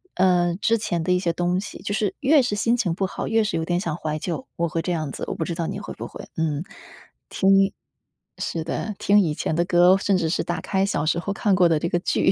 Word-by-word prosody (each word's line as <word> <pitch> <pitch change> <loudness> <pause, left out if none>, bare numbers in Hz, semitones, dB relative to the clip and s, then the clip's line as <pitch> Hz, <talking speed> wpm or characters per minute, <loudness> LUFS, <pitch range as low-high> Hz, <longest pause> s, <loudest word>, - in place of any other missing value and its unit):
呃， 180 -2 +3
之 230 - +3
前 175 -6 -2
的 180 - 0
一 180 - +2
些 175 -2 0
东 175 +2 0
西。 - - -8
就 205 - -2
是 210 -1 -1
越 285 +2 +5
是 240 -5 -1
心 230 +4 +1
情 185 -9 0
不 190 - 0
好， - - -5
越 225 0 +2
是 210 - -1
有 160 - -2
点 175 +1 0
想 165 -4 -2
怀 155 -2 -3
旧， 185 - -4
我 170 - +1
会 165 +1 -1
这 180 - -3
样 155 -4 -3
子。 - - -5
我 - - -3
不 - - -2
知 170 - -3
道 165 -1 -2
你 - - -4
会 - - -7
不 - - -6
会， - - -10
嗯。 155 -1 -1
听 - - -28 1.7
是 165 - -3
的， 205 +6 -4
听 205 +1 +4
以 160 -7 +1
前 - - -2
的 170 - +2
歌， 175 0 +5
甚 195 0 +1
至 170 -3 0
是 165 - 0
打 175 +1 -3
开 190 -1 0
小 155 -7 -1
时 165 +2 +1
候 200 - -3
看 200 +1 +1
过 180 -2 +4
的 165 - +3
这 170 +3 -1
个 175 - +1
剧。 185 - +2
175 Hz, 290 characters per minute, -23 LUFS, 165-200 Hz, 1.7 s, 越